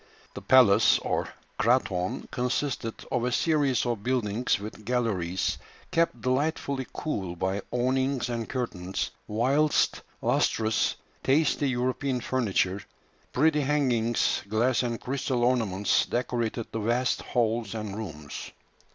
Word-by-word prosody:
The - - -7
palace 125 -7 +6
or - - -2 0.3
"kraton" 100 -7 +1
consisted 125 -2 -2
of 125 - 0
a 125 - 0
series 140 -5 +2
of 120 -4 -1
buildings 120 -2 0
with 105 +1 -8
galleries, 100 -7 -1 0.3
kept 165 -8 +1
delightfully 135 0 0
cool 95 - -3
by 95 +3 -1
awnings 130 +1 0
and 115 -2 -3
curtains, 95 -8 -3 0.2
whilst 135 +8 +2 0.2
lustres, 110 0 +1 0.3
tasty 145 0 +2
European 130 +1 -1
furniture, 100 -6 0 0.5
pretty 150 +2 +3
hangings, 125 -5 +1
glass 120 +4 +2
and 120 -2 -2
crystal 130 -2 -1
ornaments 110 -6 +2
decorated 120 -1 -1
the 115 - -3
vast 120 +4 +1
halls 115 -2 -1
and 105 -2 -4
rooms. 75 -10 -7
120 Hz, 115 wpm, -27 LUFS, 110-130 Hz, 0.5 s, palace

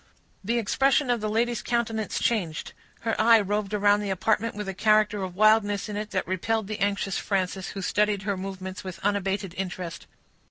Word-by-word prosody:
The 230 +5 0
expression 270 +4 +2
of 240 -3 0
the 215 - -1
lady's 235 +2 0
countenance 225 -2 -1
changed; 180 -9 -1 0.3
her 225 -1 -1
eye 230 0 +7
roved 205 0 -1
around 205 0 +3
the 205 -1 -3
apartment 215 +4 0
with 210 -1 -5
a 195 - -3
character 215 0 +3
of 185 -2 -5
wildness 215 0 +3
in 210 - -5
it 210 +1 -4
that 190 -3 -2
repelled 210 +4 -1
the 215 +1 -5
anxious 200 -1 0
Frances, 190 -1 -2
who 195 - -5
studied 210 0 +1
her 200 0 -1
movements 190 -1 -6
with 185 -2 -6
unabated 195 -2 -1
interest. 180 -3 -5
205 Hz, 185 wpm, -26 LUFS, 190-220 Hz, 0.3 s, eye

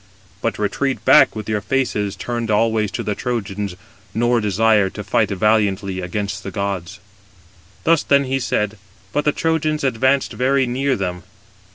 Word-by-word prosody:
But - - -1
retreat 130 +6 -1
back, - - +6
[with 110 -1 -6
your 105 -1 -1
faces] 105 -3 -1
turned 120 +3 -4
always 110 0 +2
to 95 - -4
the 105 - -1
Trojans, 100 -5 -3 0.4
nor 120 +1 +2
desire 105 0 +3
to 105 - -7
fight 100 +1 +1
valiantly 100 -2 +1
against 100 +2 -3
the 100 - -6
gods." 100 -1 -4 0.8
Thus 165 -1 +4
then 140 0 +3
he 135 0 -1
said: 105 -4 -1 0.3
but 150 - 0
the 150 - +4
Trojans 155 -1 0
advanced 130 +2 +1
very 135 +1 +2
near 130 +2 0
them. 90 -4 -3
110 Hz, 155 wpm, -20 LUFS, 100-130 Hz, 0.8 s, back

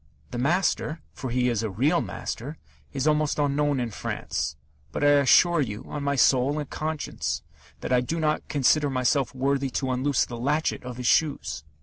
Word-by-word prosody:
The 120 - -4
master 160 +2 +1
for 130 - -5
he 125 +1 +1
is 115 -3 0
a 110 - -2
real 140 - +2
master 145 +7 -5 0.3
is 135 -1 -2
almost 150 -1 +2
unknown 145 -1 +1
in 120 -2 -2
France; 75 - -3 0.4
but - - -3
I 145 - +6
assure 170 +4 +5
you, 110 -5 -4
on 150 - -5
my 140 0 0
soul 135 +2 +3
and 150 -2 -3
conscience, 155 +1 -3 0.4
that - - -2
I 125 - +4
do 165 +7 -3
not 155 -1 0
consider 145 +1 +2
myself 130 +1 +1
worthy 135 +1 0
to 130 0 -2
unloose 130 +1 +1
the 120 - -7
latchet 150 +6 0
of 125 -1 -7
his 125 - -5
shoes." 145 - +1
140 Hz, 185 wpm, -26 LUFS, 125-150 Hz, 0.4 s, I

